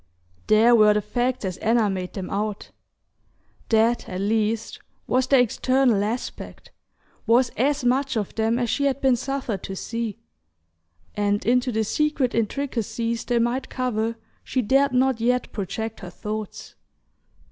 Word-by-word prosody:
There 225 +3 +5
were 215 -2 +6
the 210 - +2
facts 240 +3 -1
as 185 -1 -3
Anna 225 -1 +2
made 185 -2 -3
them 190 -2 -6
out: 205 0 -3 1.0
that, 230 +1 +2
at 185 - -4
least, 220 +2 -1 0.3
was 255 +1 +1
their 270 0 +5
external 250 -2 +2
aspect, 225 +4 -5 0.6
was 240 +2 +4
as 275 +3 0
much 260 0 +1
of 205 -3 -3
them 225 +1 +1
as 245 -1 0
she 280 +5 0
had 275 -1 +1
been 265 -2 +3
suffered 255 -4 -3
to 195 - -6
see; 230 +1 -4 1.0
and 205 0 0
into 250 +2 +2
the 220 -1 0
secret 285 +2 0
intricacies 230 -1 -2
they 240 - +1
might 240 +3 0
cover 230 -3 -1 0.3
she 255 - -1
dared 270 +5 +3
not 255 -1 +2
yet 250 +1 +1
project 220 +2 -4
her 180 - -8
thoughts. 215 +2 -6
230 Hz, 145 wpm, -24 LUFS, 215-255 Hz, 1.0 s, were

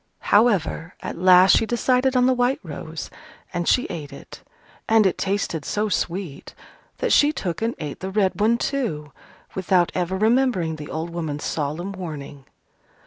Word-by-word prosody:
However, 200 -6 +2
at - - -5
last 185 +1 +7
she 225 - +2
decided 255 +2 +1
on 250 0 +4
the 260 - +4
white 250 +2 +1
rose, 160 -1 -7 0.4
and 175 -1 -2
she 250 - +3
ate 150 -5 -6
it. - - -12 0.5
And 220 -1 +5
it 190 - +2
tasted 195 -5 -2
so 210 +6 -1
sweet, 175 -5 -3 0.4
that - - 0
she 295 +1 +5
took 180 - -4
and 230 +1 -1
ate 150 -3 -6
the 190 - -4
red 195 0 0
one 225 +2 +3
too: 215 - -3 0.4
without 185 -2 +2
ever 180 +1 -1
remembering 215 -7 +1
the 150 -1 -8
old 160 +2 -4
woman's 160 -4 -4
solemn 155 +5 -3
warning. 150 -7 -8
185 Hz, 160 wpm, -23 LUFS, 160-225 Hz, 0.5 s, last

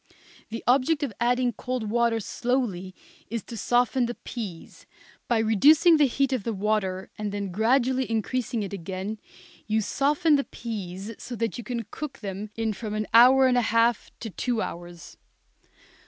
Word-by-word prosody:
The 230 +1 -6
object 275 +5 +3
of 265 -6 -2
adding 245 0 +2
cold 245 -1 -4
water 235 -1 +2
slowly 210 -6 -2 0.3
is 230 0 -3
to 235 - -9
soften 245 +3 +2
the 240 - -4
peas, 200 -9 -8 0.4
by 240 - +2
reducing 290 - +5
the 295 -2 +5
heat 275 +2 0
of 250 -6 -1
the 230 0 -2
water 190 -2 -1
and 210 -1 -2
then 200 -2 -4
gradually 255 +5 +2
increasing 230 +1 -1
it 200 - -6
again 195 +3 -5 0.5
you 220 0 +2
soften 290 - +2
the 280 - 0
peas 200 -2 -6
so 245 - -6
that 230 +1 -2
you - - -6
can 235 -2 -3
cook 300 -3 -6
them 200 +1 -5
in 225 -1 -1
from 215 0 -5
an 215 0 -1
hour 255 +3 +8
and 250 -1 +4
a - - +2
half 230 0 +2
to 225 - -5
two 240 +3 -1
hours. 175 -4 -7
230 Hz, 170 wpm, -26 LUFS, 210-255 Hz, 0.5 s, hour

